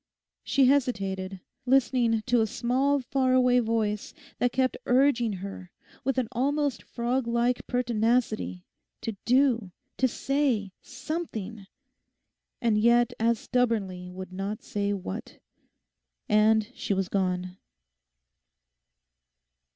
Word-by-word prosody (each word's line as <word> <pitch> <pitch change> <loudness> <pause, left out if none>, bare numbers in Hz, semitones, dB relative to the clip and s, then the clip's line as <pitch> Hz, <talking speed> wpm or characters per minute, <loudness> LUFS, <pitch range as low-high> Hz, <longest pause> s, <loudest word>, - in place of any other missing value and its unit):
She 275 -1 +3
hesitated, 195 -8 0 0.3
listening 245 -3 +3
to 245 -1 +2
a 220 - +2
small 260 +5 +1
far 255 0 +1
away 250 -1 +4
voice 220 -3 -1 0.2
that 245 - +2
kept 260 0 +1
urging 245 -3 +3
her 190 -1 -7 0.3
with 270 +1 0
an 255 -3 +1
almost 280 +1 0
frog 240 +1 -2
like 235 +1 0
pertinacity 230 -5 0 0.4
to 225 - -4
do, 245 -5 +3 0.3
to 260 - +3
say 255 -6 0
something, 230 - -6 0.9
and 225 -3 +2
yet 235 +1 +4
as 230 +1 +2
stubbornly 210 -8 -1
would 185 0 -8
not 195 +3 -4
say 205 0 -2
what; 185 - -5 0.9
and 215 +1 +3
she 200 - -2
was 190 -1 0
gone. 185 -1 -1
235 Hz, 110 wpm, -27 LUFS, 205-255 Hz, 0.9 s, away